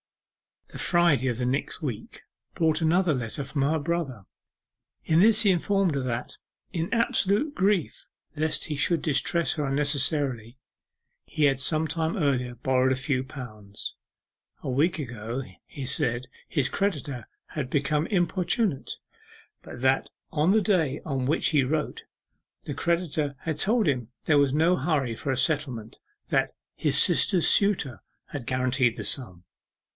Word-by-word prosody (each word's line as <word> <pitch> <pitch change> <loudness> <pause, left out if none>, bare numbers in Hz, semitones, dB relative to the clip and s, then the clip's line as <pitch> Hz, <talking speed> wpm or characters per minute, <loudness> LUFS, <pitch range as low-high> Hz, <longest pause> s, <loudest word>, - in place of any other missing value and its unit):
The - - -10
Friday 170 -7 +3
of 120 -3 -1
the 125 - -1
next 135 +7 -2
week 125 -9 -6 0.3
brought 160 -1 +1
another 170 +1 +3
letter 125 +2 -4
from 135 +1 -3
her 150 +4 +2
brother. 145 -8 -3 0.8
In 160 +1 +3
this 215 +3 +6
he 200 - +5
informed 190 -1 +1
her 140 - 0
that, 120 -1 -4 0.3
in 170 -1 -3
absolute 230 +4 +1
grief 195 - 0 0.3
lest 155 +1 0
he 150 - -4
should 160 +3 +2
distress 160 +3 +1
her 150 -3 -1
unnecessarily, 135 -4 0 0.7
he 155 - -1
had 135 -2 +3
some 155 +4 +2
time 160 +1 -1
earlier 130 -6 0
borrowed 130 +1 +2
a - - -1
few 130 -1 -1
pounds. 110 -7 -7 0.7
A - - -3
week 150 +8 +1
ago, 120 -2 -5 0.2
he 140 - -7
said, 120 0 -1 0.2
his 140 -5 0
creditor 145 - -2 0.4
became 150 +3 0
importunate, 180 - 0 0.7
but 120 - -10
that 130 +1 +2 0.2
on 155 +4 +2
the 215 +1 +4
day 165 -8 +1
on 135 -4 -2
which 155 +5 +1
he 150 -4 +3
wrote, 150 +3 -2 0.6
the 145 - -5
creditor 155 -2 -1
had 160 -2 -3
told 220 +1 +2
him 125 -6 0 0.2
there 150 -2 +4
was 140 -2 +2
no 165 +4 +3
hurry 140 -10 0
for 135 - -3
a 130 - -1
settlement, 130 -5 -1 0.3
that - - +1 0.2
'his - - +1
sister's 180 -4 +4
suitor 150 - +2 0.3
had 130 -5 -7
guaranteed 130 -2 +1
the - - -6
sum. 95 -10 -4
145 Hz, 150 wpm, -26 LUFS, 130-170 Hz, 0.8 s, this